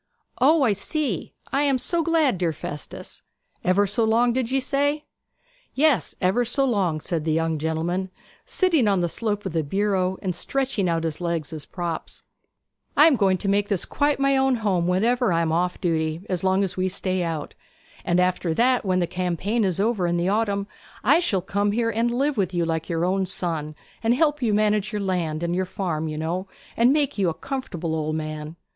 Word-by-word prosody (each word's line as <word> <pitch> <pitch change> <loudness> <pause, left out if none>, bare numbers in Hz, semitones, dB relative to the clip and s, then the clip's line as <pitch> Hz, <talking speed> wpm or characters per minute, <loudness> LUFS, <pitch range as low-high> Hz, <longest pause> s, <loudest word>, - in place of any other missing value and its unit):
'O 295 +4 +5
I 225 -5 +3
see! 225 - -3 0.2
I 275 - +2
am 280 -2 +2
so 340 +6 0
glad, 315 - +2
dear 170 -3 0
Festus. 145 -1 -7 0.4
Ever 185 +3 +3
so 205 +4 0
long, 230 +2 +3
did 250 -2 -1
ye 270 +1 +2
say?' 285 +3 0 0.7
'Yes, 295 -2 +2
ever 190 +6 +2
so 255 +4 +1
long,' 190 -10 +1
said 160 0 -2
the 160 - 0
young 165 0 0
gentleman, 165 +4 -1 0.3
sitting 330 - +2
on 195 -3 +2
the 175 - +1
slope 205 +3 -2
of 190 - -3
the 165 - +1
bureau 190 +3 0
and 185 -3 -1
stretching 250 -2 -1
out 165 -1 0
his 160 0 -3
legs 170 -2 -2
as 155 -3 -6
props. 170 -3 -5 0.7
'I 300 - +8
am 320 -4 +6
going 195 -5 +2
to 200 - -4
make 200 +1 +2
this 200 -4 0
quite 290 -1 0
my 275 0 +3
own 265 -1 +3
home 195 -7 0
whenever 230 +5 +2
I 170 0 +2
am 160 - 0
off 175 +2 0
duty, 160 0 -1
as 180 -1 -2
long 190 +1 +3
as 190 - -3
we 185 0 0
stay 185 0 -1
out. 165 -4 -3 0.5
And 175 0 +1
after 180 -2 +1
that, 250 +4 +3
when 185 -2 +1
the - - +2
campaign 185 +6 -1
is 185 -2 0
over 205 -4 +1
in 175 0 0
the 175 +2 +1
autumn, 200 -1 0 0.4
I 285 +9 +5
shall 210 - 0
come 205 +2 0
here, 230 +1 +1
and 230 +2 +1
live 270 +3 0
with 185 -3 0
you 170 -1 +1
like 165 -1 -2
your 165 0 0
own 190 +1 0
son, 160 -5 -3 0.3
and 230 +2 +2
help 295 0 +2
manage 215 -2 +1
your 210 -2 -2
land 170 -4 -1
and 170 0 -1
your 185 +1 0
farm, 170 -4 -3
you 155 -1 -4
know, 170 +5 -2 0.3
and 235 +3 +4
make 285 -6 +1
you 190 -3 +3
a 160 - -4
comfortable 180 - -4
old 155 0 -2
man.' 155 0 -5
190 Hz, 205 wpm, -24 LUFS, 170-240 Hz, 0.7 s, I